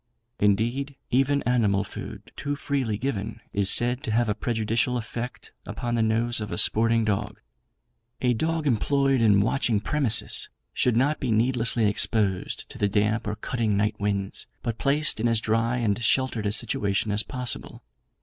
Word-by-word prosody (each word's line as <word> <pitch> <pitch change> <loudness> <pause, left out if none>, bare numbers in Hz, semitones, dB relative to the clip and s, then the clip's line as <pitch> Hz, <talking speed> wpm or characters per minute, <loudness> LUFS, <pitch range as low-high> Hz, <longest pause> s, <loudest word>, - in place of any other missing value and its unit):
Indeed, 120 +8 0 0.2
even 135 +3 +2
animal 105 -5 +1
food - - -9
too 145 0 -3
freely 135 -7 -2
given 110 -3 -4
is 100 -1 +2
said 125 +2 +4
to 135 - -5
have 120 +2 +1
a 105 - +1
prejudicial 115 +2 -1
effect 120 +1 -6
upon 120 0 -4
the 115 - +1
nose 115 +1 +1
of 105 0 -5
a - - -3
sporting 115 0 +3
dog. 105 -2 -2 0.8
A 125 -1 +1
dog 160 +6 -1
employed 135 +1 +1
in 105 -3 +4
watching 115 0 +1
premises 135 0 +1 0.2
should 125 -2 +1
not 145 +5 +1
be 130 - -3
needlessly 115 0 +2
exposed 100 -2 0
to - - -11
the 100 - +1
damp 105 +3 0
or 105 - -2
cutting 110 -3 -1
night 105 +1 -1
winds; 100 -1 -2 0.2
but 115 -3 -3
placed 145 -2 +2
in 115 - +1
as 115 -1 +2
dry 115 +2 0
and 115 -2 -1
sheltered 120 -5 +1
a - - 0
situation 105 -2 +2
as 105 +1 +2
possible. 125 -1 -3
115 Hz, 165 wpm, -25 LUFS, 105-125 Hz, 0.8 s, said